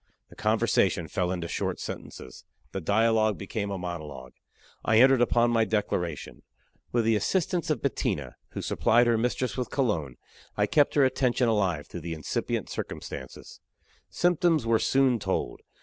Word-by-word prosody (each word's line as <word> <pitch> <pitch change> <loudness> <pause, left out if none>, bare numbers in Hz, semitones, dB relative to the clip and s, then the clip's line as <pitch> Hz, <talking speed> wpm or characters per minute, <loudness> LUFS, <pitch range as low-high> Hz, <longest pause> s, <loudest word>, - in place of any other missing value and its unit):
The - - -15
conversation - - +1
fell 90 -1 -1
into 85 -2 -3
short - - -3
sentences. - - -8 0.3
The 95 - -4
dialogue 110 +3 +2
became 100 +1 -4
a 100 - -3
monologue. 75 -8 -7 0.5
I 110 - +3
entered 130 0 +6
upon 120 0 +3
my 115 -1 +3
declaration. 90 -8 -2 0.5
With 120 -2 +1
the 115 0 +3
assistance 170 - 0
of 155 - -1
Bettina, 140 - -2 0.2
who - - -5
supplied 120 +2 +3
her 120 -1 +3
mistress 125 +2 -1
with 125 - -2
cologne, 85 - -1 0.4
I - - +3
kept 145 -2 +2
her 145 -2 +5
attention 125 -1 +1
alive 95 -9 +1
through - - -8
the 85 -1 -4
incipient 80 - -3
circumstances. 65 - -7 0.5
Symptoms 175 -5 +2
were 115 -1 +3
soon 130 -3 +2
told. 95 -10 -2
110 Hz, 150 wpm, -27 LUFS, 90-125 Hz, 0.5 s, entered